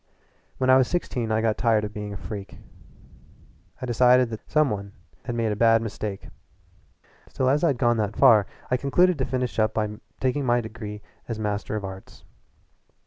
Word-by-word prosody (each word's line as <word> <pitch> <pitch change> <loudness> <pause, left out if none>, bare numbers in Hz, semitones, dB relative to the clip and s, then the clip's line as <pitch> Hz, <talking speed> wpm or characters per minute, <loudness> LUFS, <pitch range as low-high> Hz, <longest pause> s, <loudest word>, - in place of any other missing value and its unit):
When 130 0 +2
I 130 - +7
was 130 -2 +3
sixteen 125 -10 -2
I 110 0 +1
got 110 -1 0
tired 115 -3 +2
of 105 - -7
being 105 -1 -6
a 100 - -6
freak; 100 0 -8 1.2
I 130 - -4
decided 125 0 +4
that 110 - -8
some 155 -3 +3
one 100 -1 -5 0.3
had 120 - -3
made 115 -2 0
a - - -1
bad 115 +1 +4
mistake. 105 -2 -5 1.0
Still 130 - -1
as 145 +4 +2
I'd 145 -7 +2
gone 120 -2 +2
that 105 -1 -1
far 105 -3 +6 0.2
I 125 - +3
concluded 160 +6 +2
to 130 - +1
finish 125 -2 -2
it - - +5
up 110 - 0
by 105 -1 -2 0.2
taking 130 +2 0
my 120 -1 +2
degree 110 -2 -7 0.3
of 115 - -3
Master 105 0 -3
of 105 -2 -3
Arts. 95 0 -10
115 Hz, 190 wpm, -25 LUFS, 105-130 Hz, 1.2 s, I